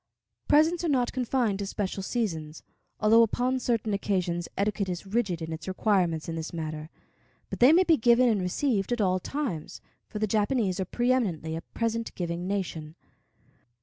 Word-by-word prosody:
Presents 320 +4 +4
are 335 - 0
not 250 -4 +1
confined 245 -5 0
to 200 - -3
special 195 -1 -3
seasons, 165 -8 -3 0.4
although 220 +2 +6
upon 250 +3 +1
certain 230 -4 -1
occasions 180 -4 -1
etiquette 200 -1 0
is 180 +2 -4
rigid 195 -5 -1
in 160 0 -4
its 160 - -8
requirements 185 -5 +1
in 165 - -3
this 160 0 -5
matter, 155 -2 -5 0.6
but - - -5
they 250 +4 +7
may 350 +3 +6
be 330 -3 +4
given 240 +2 +4
and 215 -5 +2
received 195 +3 0
at 240 - 0
all 185 -3 +2
times, 240 - -4 0.3
for - - -7
the 215 - +1
Japanese 210 -2 0
are 190 - -1
preëminently 215 -12 0
a 165 - -4
present 230 0 -2
giving 175 0 -3
nation. 165 -6 -4
205 Hz, 170 wpm, -27 LUFS, 175-240 Hz, 0.6 s, they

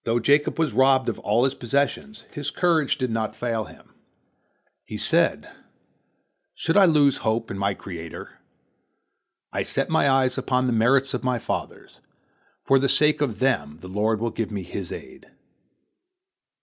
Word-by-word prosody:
Though 115 +1 0
Jacob 145 +5 +2
was 160 -2 0
robbed 130 -1 +3
of 115 - -5
all 115 +4 +1
his 135 - +1
possessions, 140 - -2
his 145 -1 -4
courage 165 -5 +1
did 130 -3 -2
not 110 -1 -2
fail 115 -3 -2
him. - - -17 0.9
He - - -7
said: - - +2 1.1
"Should 165 - -1
I 200 -1 +7
lose 145 -5 +4
hope 110 +1 -2
in 100 - -5
my 100 0 0
Creator? 85 -5 -9 1.1
I - - -1
set - - -2
my 140 - +3
eyes 130 -1 +2
upon 130 0 0
the 125 - 0
merits 130 +4 +2
of - - -3
my 125 -1 0
fathers. - - -6 0.6
For 135 - +4
the 135 0 +1
sake 150 +2 +3
of 120 -8 -1
them 80 - 0
the 90 - -9
Lord 105 +3 0
will 115 0 -2
give 115 -1 -3
me 100 -3 -5
His 90 +1 -6
aid." - - -10
125 Hz, 160 wpm, -24 LUFS, 110-140 Hz, 1.1 s, I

